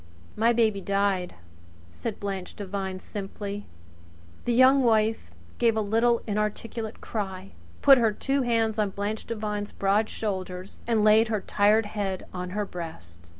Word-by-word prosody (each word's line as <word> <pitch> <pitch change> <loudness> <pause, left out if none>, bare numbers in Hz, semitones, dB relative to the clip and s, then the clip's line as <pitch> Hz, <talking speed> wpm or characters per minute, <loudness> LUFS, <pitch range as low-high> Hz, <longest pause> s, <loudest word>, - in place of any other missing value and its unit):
"My 230 +2 +3
baby 220 -4 +2
died," 195 -2 0 0.6
said 225 - -5
Blanche 195 -2 -5
Devine 190 -2 -4
simply. 200 +1 -6 0.8
The 240 - +1
Young 260 +3 +6
Wife 220 - +2 0.3
gave 230 -2 +3
a - - +2
little 230 +3 +2
inarticulate 215 +1 -3
cry, 195 -3 -5 0.3
put 275 -2 +8
her 225 -2 +3
two 270 +6 -1
hands 225 -3 +1
on 210 -2 +2
Blanche 205 +3 -4
Devine's 210 -2 -3
broad 205 +3 +1
shoulders 185 -3 -4
and 225 -3 +2
laid 215 +2 +6
her 215 -2 -1
tired 210 +3 +3
head 200 -3 -3
on 180 0 -4
her 210 - 0
breast. 90 - -9
210 Hz, 145 wpm, -27 LUFS, 195-225 Hz, 0.8 s, put